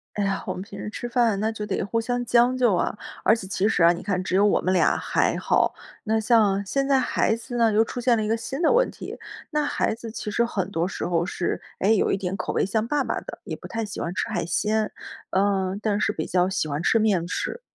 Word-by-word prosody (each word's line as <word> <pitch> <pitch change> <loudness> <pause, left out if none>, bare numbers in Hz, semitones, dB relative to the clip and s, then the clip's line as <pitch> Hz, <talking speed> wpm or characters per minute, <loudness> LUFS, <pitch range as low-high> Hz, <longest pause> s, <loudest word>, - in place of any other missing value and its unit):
哎 205 - 0
呀， 195 0 -1
我 - - 0
们 180 - -6
平 200 0 -10
时 210 - -5
吃 240 - -5
饭 235 -4 +2
那 220 +2 0
就 210 -1 -5
得 200 -2 -2
互 230 +4 -1
相 245 +1 -2
将 245 +2 +3
就 240 -6 +3
啊。 210 - 0 0.3
而 220 - +4
且 190 - -7
其 195 +2 0
实 180 -6 +2
啊， 170 - +7
你 175 - -6
看 190 -3 -1
只 185 - -2
有 200 +2 +5
我 205 - +3
们 185 - 0
俩 175 - +3
还 - - +1
好， - - +1 0.3
那 220 0 +1
像 210 -3 +3
现 275 +5 0
在 270 -1 +4
孩 240 -2 +1
子 240 +1 -7
呢， 230 -2 +3
又 220 +2 +4
出 245 - -5
现 240 -1 +3
了 215 - -1
一 - - -2
个 225 +1 +1
新 235 +6 -5
的 335 - +4
问 - - +3
题。 - - -8 0.3
那 300 -1 0
孩 285 -5 0
子 230 -1 -8
其 215 - -6
实 235 +2 +2
很 195 -5 -2
多 170 +3 0
时 - - -4
候 170 -1 +1
是， 180 -1 -2 0.2
哎， 200 - +2
有 215 - +2
一 - - +2
点 190 0 -3
口 185 - -3
味 - - +1
像 220 +2 0
爸 290 -3 +1
爸 - - -2
的， - - -9
也 - - -4
不 - - -11
太 225 0 -3
喜 205 - -6
欢 170 - -2
吃 - - -2
海 - - -2
鲜， 215 +5 0 0.4
嗯， 190 0 +1
但 210 -1 0
是 - - +1
比 155 - -4
较 180 +1 +2
喜 190 -4 -1
欢 150 +2 -3
吃 225 - +3
面 195 -6 +1
食。 475 - -3
215 Hz, 285 characters per minute, -24 LUFS, 190-235 Hz, 0.4 s, 啊